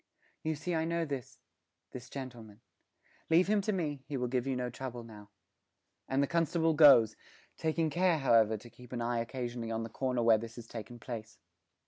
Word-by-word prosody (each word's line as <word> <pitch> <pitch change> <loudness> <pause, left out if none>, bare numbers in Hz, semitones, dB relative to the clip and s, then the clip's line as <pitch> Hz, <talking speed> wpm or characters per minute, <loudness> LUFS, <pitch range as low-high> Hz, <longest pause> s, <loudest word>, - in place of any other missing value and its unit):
'You 160 0 -1
see 175 +4 -3
I 160 -1 +1
know 170 0 0
this 140 -5 -6 0.5
this 125 -1 -9
gentleman. 120 -6 -8 0.7
Leave 165 +3 +5
him 210 0 +3
to 215 - -1
me; 150 -8 -2
he 145 - -3
will 125 -1 -1
give 125 +1 -1
you 135 - 0
no 125 -1 -2
trouble 125 -1 -6
now.' 105 -3 -12 0.8
And 135 +1 +2
the - - 0
constable 165 0 +2
goes, 140 -8 +7 0.4
taking 160 0 0
care, 175 0 +3
however, 115 -6 +4
to 120 +3 -13
keep 125 0 -13
an 120 - -2
eye 120 0 0
occasionally 120 -1 -4
on 115 0 -2
the 115 - -6
corner 125 0 -1
where 115 -2 +5
this 115 0 -8
has 120 - -9
taken 115 +1 -8
place. 115 -2 -7
125 Hz, 190 wpm, -32 LUFS, 115-155 Hz, 0.8 s, goes